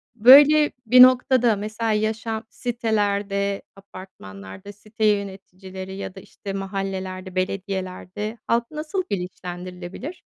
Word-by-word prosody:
Böyle 290 +6 +7
bir 250 +3 +7
noktada 255 -2 +4
mesela, 215 +2 -3
yaşam 220 +1 -2
sitelerde, 205 -4 -1
apartmanlarda 185 - -12
site 215 +1 -4
yöneticileri 190 -2 -3
ya 195 -1 -7
da 190 - -9
işte, 195 +1 -9
mahallelerde, 190 -1 -5
belediyelerde 190 +2 -4
halk 235 +2 0
nasıl 310 +5 -3
bilinçlendirilebilir? 180 - -7
200 Hz, 100 wpm, -23 LUFS, 190-225 Hz, -, Böyle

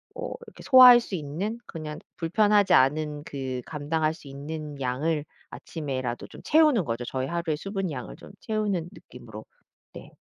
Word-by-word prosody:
어 - - -5
그렇게 480 0 -14
소화할 255 -2 +9
수 205 - -5
있는 175 +8 -4
그냥 155 -2 -7 0.2
불편하지 205 +4 +3
않은 150 +2 +2
그 130 -5 -5
감당할 155 +1 -1
수 155 -3 -15
있는 145 +1 -7
양을 145 +4 -1 0.2
아침에라도 130 -6 -5
좀 - - -13
채우는 300 - +4
거죠. 115 0 -3
저희 130 +1 -3
하루의 170 -1 -2
수분 195 +1 -4
양을 125 -4 -7
좀 - - -14
채우는 205 -6 -2
느낌으로 110 - -12 0.5
네 - - -11
155 Hz, 330 characters per minute, -26 LUFS, 140-195 Hz, 0.5 s, 소화할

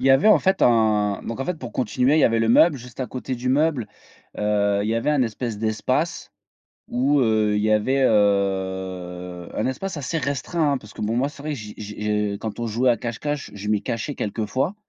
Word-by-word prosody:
Il 130 - 0
y - - +6
avait 135 +10 +5
en 215 - +7
fait 190 0 +1
un 110 -4 +3
donc 115 - -5
en - - -1
fait 180 - -1
pour 125 -4 -7
continuer 125 +3 +1
il - - +4
y - - +5
avait 115 0 +3
le 115 - +1
meuble. 155 +6 +5
Juste 125 +1 -10
à 130 - -1
côté 130 +2 -5
du 125 +1 -4
meuble, 140 -3 +2 0.5
heu, 105 -1 +1
il 105 - -2
y 115 - +1
avait 115 +6 0
un 145 -3 +3
espèce 115 -1 -3
d'espace 130 +9 -1 0.6
où, 135 +4 +2
heu, 110 -3 +2
il 105 - 0
y 110 - +2
avait, 130 +6 +2
heu, 95 -4 -1
un - - 0
espace 165 +9 -3
assez 145 +3 -2
restreint, 145 +2 0
hein, 140 - 0
parce 105 -2 -14
que - - -9
bon 110 +2 -1
moi 135 +3 +1
c'est 145 -1 -12
vrai 155 - -4
que - - -4
j'y 105 -1 -8
j'y 105 0 -7
je 105 -1 0
quand 110 0 -6
on 120 - -1
jouait 120 +3 +2
à 120 - +3
cache-cache, 135 +6 -4
je 105 +1 -6
m'y 105 -1 +1
cachais 115 +7 -3
quelquefois. 110 - -2
115 Hz, 235 wpm, -23 LUFS, 105-135 Hz, 0.6 s, en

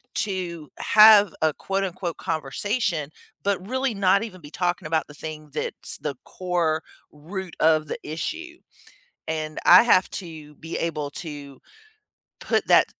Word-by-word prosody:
to 175 -6 -3
have 210 -3 +7
a, 155 -2 +3
quote-unquote, 190 -3 -3
"conversation," 165 - -2 0.3
but 195 -2 -1
really 260 -2 0
not 195 +1 +3
even 185 -6 -8
be 145 - -11
talking 175 -3 -1
about 160 0 0
the 150 - -13
thing 155 0 -8
that's - - -3
the 145 -3 -4
core 170 -4 -1 0.3
root 175 +4 -7
of 155 -1 +3
the - - -4
issue. 335 - -5 0.7
And 155 -1 -3
I 180 +5 +9
have 185 -6 +4
to 155 -5 -8
be 165 +1 -6
able 150 -4 -2
to 145 -4 -8 0.8
put - - 0
that - - +6
170 Hz, 140 wpm, -24 LUFS, 155-195 Hz, 0.8 s, I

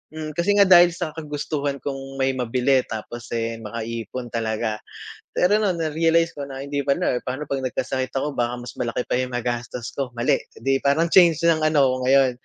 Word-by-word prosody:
hmm, 155 -1 -5
kasi 185 +5 +2
nga 200 - +7
dahil 175 -1 +8
sa 165 -2 -5
kagustuhan 145 -2 -3
kong 135 -1 -6
may 135 0 +1
mabili 125 +2 +2
tapos, 115 +1 -7
eh, 115 -1 -2
makaipon 115 +2 -5
talaga. 110 -1 -1 0.6
Pero 195 +4 +4
no'n 200 -4 +1
narealize 165 +1 +2
ko 145 - -6
na 135 -1 -7
hindi 140 0 -2
pala. 140 -2 +1
Pa'no 130 +4 -4
'pag 135 -1 -1
nagkasakit 130 +1 -2
ako, 145 +2 -1
baka 120 0 0
mas 120 - -8
malaki 120 0 -1
pa - - -1
yung 130 -1 -3
magastos 120 0 -3
ko 130 -3 -3
mali, 120 +1 +2 0.2
'di 135 0 +2
parang 155 +4 +2
change 170 -4 +6
ng 165 - +4
ano, 155 -1 +3
ako 130 - 0
ngayon. 135 -1 +5
135 Hz, 190 wpm, -23 LUFS, 120-155 Hz, 0.6 s, dahil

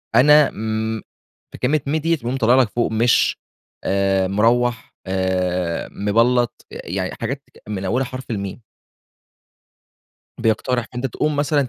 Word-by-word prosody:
أنا 150 +4 +7
امم 110 +1 -3 0.5
في - - -10
كلمة، 145 +3 +1
ميم 145 - 0
ديَّة 165 +2 +2
بتقوم 125 -2 -3
طالِعة 120 0 +4
لك 115 - 0
فوق 120 +1 -1
مش 115 +2 +3 0.5
آآ، 95 -1 +1
مروّح 115 +4 +1
آآ، 90 -2 -1
مبلَّط 120 +4 +1
يعني، 95 +1 -4
حاجات 135 +4 -3 0.2
من 100 -2 -4
أولها 125 +7 0
حرف 130 -1 -7
الميم. 100 +2 -4 1.8
بيقترح، 115 +1 0
فأنتَ 125 +2 -2
تقوم 150 +4 -1
مثلًا 145 -2 +1
115 Hz, 130 wpm, -21 LUFS, 100-130 Hz, 1.8 s, أنا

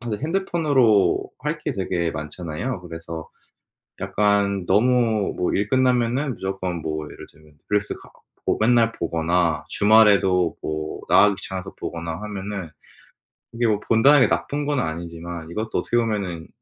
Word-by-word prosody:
다들 120 0 -4
핸드폰으로 150 - +2
할 150 +3 -2
게 150 -1 -3
되게 90 -4 -1
많잖아요. 80 - -5
그래서 80 -2 -8 0.7
약간 100 -2 +1
너무 110 +1 +2
뭐 90 - 0
일 100 +1 0
끝나면은 130 +2 +2
무조건 95 -3 -4
뭐 75 0 -3
예를 - - -11
들면 75 0 -21 0.2
릴스카 105 -1 -2 0.4
뭐 - - +2
맨날 115 0 +3
보거나 85 -2 0
주말에도 100 -4 +4
뭐 80 0 -4
나가기 105 -1 +6
귀찮아서 95 -1 -6
보거나 85 -1 -5
하면은 100 -4 -5 0.8
이게 120 0 0
뭐 105 -2 +2
본다는 125 +7 +5
게 - - +6
나쁜 145 0 -2
건 145 -2 0
아니지만 85 -1 -5
이것도 110 +4 -2
어떻게 120 - -1
보면은 100 -8 -2
100 Hz, 310 characters per minute, -23 LUFS, 85-120 Hz, 0.8 s, 나가기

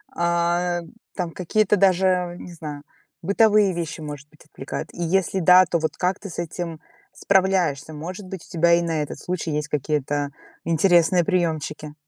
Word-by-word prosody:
а, 170 +1 +1 0.4
там, 175 -3 -3
какие-то 210 +4 +1
даже, 185 -2 +2
не 175 - -9
знаю, 150 -3 -8 0.4
бытовые 205 +1 +4
вещи, 170 -2 -4
может 145 -1 -8
быть, 155 0 -21
отвлекают? 135 -3 -7
И 175 - -7
если 190 +2 +1
да, 180 +2 +7
то 170 - 0
вот 160 - -3
как 180 +1 0
ты 200 - -8
с 170 - -7
этим 165 -1 -5 0.3
справляешься? 185 -7 +1
Может 180 +6 -7
быть, 190 -2 -8
у - - -20
тебя 170 0 +3
и 170 - +4
на 165 -2 -1
этот 145 - -7
случай 175 -3 -3
есть 150 0 -2
какие-то 145 -1 -1 0.3
интересные 175 +1 +3
приёмчики? 155 -5 -2
170 Hz, 165 wpm, -23 LUFS, 155-185 Hz, 0.4 s, да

